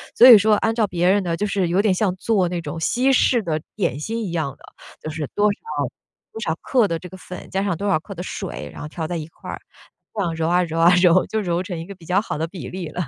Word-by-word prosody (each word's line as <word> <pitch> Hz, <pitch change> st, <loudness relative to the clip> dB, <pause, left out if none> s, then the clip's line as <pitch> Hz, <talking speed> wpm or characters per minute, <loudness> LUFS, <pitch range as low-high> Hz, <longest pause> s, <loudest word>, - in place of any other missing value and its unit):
所 245 Hz, -, +9 dB
以 240 Hz, -4 st, +12 dB
说 210 Hz, +1 st, +4 dB
按 225 Hz, +2 st, 0 dB
照 225 Hz, -2 st, +3 dB
别 175 Hz, -2 st, 0 dB
人 200 Hz, +1 st, +3 dB
的 170 Hz, -2 st, -2 dB
就 210 Hz, -, -1 dB
是 195 Hz, -3 st, 0 dB
有 180 Hz, +3 st, +3 dB
点 205 Hz, -2 st, +3 dB
像 185 Hz, 0 st, +1 dB
做 190 Hz, -3 st, +1 dB
那 175 Hz, -1 st, -2 dB
种 165 Hz, -, -6 dB
西 255 Hz, +10 st, +2 dB
式 245 Hz, -2 st, +3 dB
的 160 Hz, -3 st, -2 dB
点 180 Hz, -, -1 dB
心 225 Hz, +8 st, -3 dB
一 185 Hz, -, -4 dB
样 155 Hz, -5 st, -2 dB
的， -, -, -23 dB, 0.4 s
就 -, -, -5 dB
是 155 Hz, -1 st, -4 dB
多 205 Hz, -, +2 dB
少 200 Hz, -, -6 dB, 0.8 s
多 220 Hz, -, -7 dB
少 165 Hz, -7 st, 0 dB
克 250 Hz, -4 st, +2 dB
的 165 Hz, -2 st, -2 dB
这 180 Hz, -, -9 dB
个 190 Hz, -, -11 dB
粉， 180 Hz, -1 st, -10 dB
加 195 Hz, 0 st, -1 dB
上 200 Hz, -4 st, 0 dB
多 200 Hz, -, -3 dB
少 195 Hz, -, +3 dB
克 200 Hz, +5 st, -10 dB
的 180 Hz, -, -7 dB
水， 190 Hz, 0 st, -6 dB
然 -, -, -9 dB
后 150 Hz, -, -5 dB
调 160 Hz, 0 st, -4 dB
在 175 Hz, -, -3 dB
一 155 Hz, -, -5 dB
块 165 Hz, -, -12 dB
儿， -, -, -5 dB, 0.5 s
这 210 Hz, -, -2 dB
样 170 Hz, -4 st, -1 dB
揉 160 Hz, 0 st, -1 dB
啊 180 Hz, +1 st, +3 dB
揉 165 Hz, -1 st, -5 dB
啊， 170 Hz, +2 st, +6 dB
揉， 180 Hz, 0 st, +5 dB
就 220 Hz, -, -1 dB
揉 175 Hz, -2 st, -1 dB
成 180 Hz, -4 st, -5 dB
一 165 Hz, -, -6 dB
个 200 Hz, -, -9 dB
比 175 Hz, -3 st, -17 dB
较 185 Hz, +4 st, +2 dB
好 215 Hz, -, -4 dB
的 160 Hz, -, -1 dB
比 175 Hz, 0 st, -8 dB
例 180 Hz, -3 st, -5 dB
了。 175 Hz, -, -4 dB
180 Hz, 310 characters per minute, -22 LUFS, 165-205 Hz, 0.8 s, 以